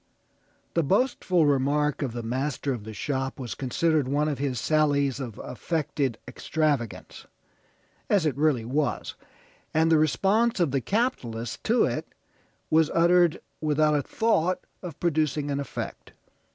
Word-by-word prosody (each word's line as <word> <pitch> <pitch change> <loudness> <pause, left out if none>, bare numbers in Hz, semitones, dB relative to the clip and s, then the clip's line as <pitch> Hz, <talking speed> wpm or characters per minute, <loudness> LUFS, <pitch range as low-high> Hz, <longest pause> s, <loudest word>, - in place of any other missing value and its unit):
The 170 - +2
boastful 185 - +2
remark 145 +1 +1
of 130 -5 -2
the 120 -1 -5
master 135 +3 -2
of 110 -4 -7
the 110 - -6
shop 135 0 -2
was 125 -3 -4
considered 150 +2 0
one 145 +3 +1
of 145 -3 -2
his 135 -4 -1
sallies 140 -1 +2
of 120 -6 -6
affected 145 -3 -2
extravagance, 140 -3 -2 0.8
as 195 -6 +3
it 150 -5 +1
really 140 -6 +1
was, 140 +2 -1 0.6
and 160 +1 +3
the 160 - +5
response 200 - +2
of 170 -6 +2
the 135 -1 0
capitalist 120 - -2
to 235 +2 +3
it - - -3 0.6
was 160 -1 +4
uttered 170 0 +4 0.2
without 155 0 +2
a 145 - +2
thought 185 - 0 0.2
of 170 -4 -8
producing 150 -3 0
an 140 - -1
effect. 140 - -6
150 Hz, 140 wpm, -26 LUFS, 135-165 Hz, 0.8 s, the